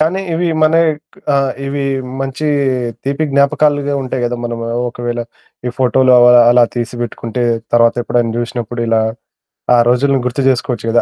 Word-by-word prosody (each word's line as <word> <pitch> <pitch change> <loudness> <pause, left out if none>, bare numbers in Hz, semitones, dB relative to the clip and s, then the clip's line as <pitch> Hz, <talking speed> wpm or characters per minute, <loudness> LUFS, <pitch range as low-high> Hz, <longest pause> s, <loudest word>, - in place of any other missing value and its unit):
కానీ 170 +5 +1
ఇవి 170 +2 0 0.2
మన 155 +1 +3 0.2
ఇక్ 150 +5 -15 0.2
ఆ! - - +3 0.3
ఇవి 140 +1 -3 0.4
మంచి 135 +3 -3 0.6
తీపి 140 +3 -1
జ్ఞాపకాలుగా 145 +1 +2
ఉంటాయి 130 -1 -3
గదా! 120 0 -2
మనము 115 -1 -4 0.3
ఒకవేళ 120 0 -4 0.5
ఈ - - -1
ఫోటోలు 130 0 +3
అవి 120 0 +6 0.2
అలా 120 0 +5
తీసిపెట్టుకుంటే, 120 0 -4 0.3
తర్వాత 115 0 +4
ఎప్పుడైనా 120 -1 0
జూషినప్పుడు 120 0 -4
ఇలా, 115 -1 +2 0.8
ఆ - - +4
రోజుల్ని 135 +2 +2
గుర్తు 125 +2 -2
జేసుకోవచ్చు 120 -3 -2
కదా! 120 - +3
125 Hz, 145 wpm, -15 LUFS, 120-140 Hz, 0.8 s, అవి